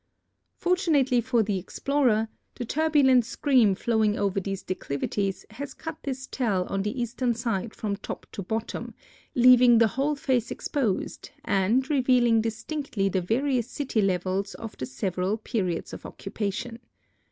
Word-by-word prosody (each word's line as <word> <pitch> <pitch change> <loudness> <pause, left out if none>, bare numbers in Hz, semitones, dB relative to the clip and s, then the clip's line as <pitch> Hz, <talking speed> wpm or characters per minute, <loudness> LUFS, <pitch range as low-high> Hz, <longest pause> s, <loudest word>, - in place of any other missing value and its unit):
Fortunately 310 -9 +2
for 235 -1 +2
the 200 -2 -1
explorer, 235 +2 +1 0.3
the 245 - -4
turbulent 280 -3 +4
stream 245 -4 +3
flowing 220 0 +1
over 200 -1 0
these 195 0 -4
declivities 185 +3 -3
has 275 +5 -7
cut 325 -1 -6
this 265 -1 -4
tel 210 -10 0
on 195 - -1
the 210 +5 -3
eastern 240 0 -1
side 230 -2 -2
from 205 -2 -2
top 200 - -7
to - - -5
bottom, 220 +4 -4 0.4
leaving 245 -1 +7
the 225 -1 +5
whole 275 +7 0
face 260 -6 0
exposed 240 -10 -2 0.2
and 210 +7 +2
revealing 250 -4 +4
distinctly 230 -1 -2
the 190 -1 0
various 245 +5 0
city 265 -6 -1
levels 190 +1 -1
of 225 -1 -8
the 130 - -4
several 180 - -1
periods 200 -6 -2
of - - -8
occupation. 210 +3 -5
230 Hz, 140 wpm, -26 LUFS, 195-260 Hz, 0.4 s, leaving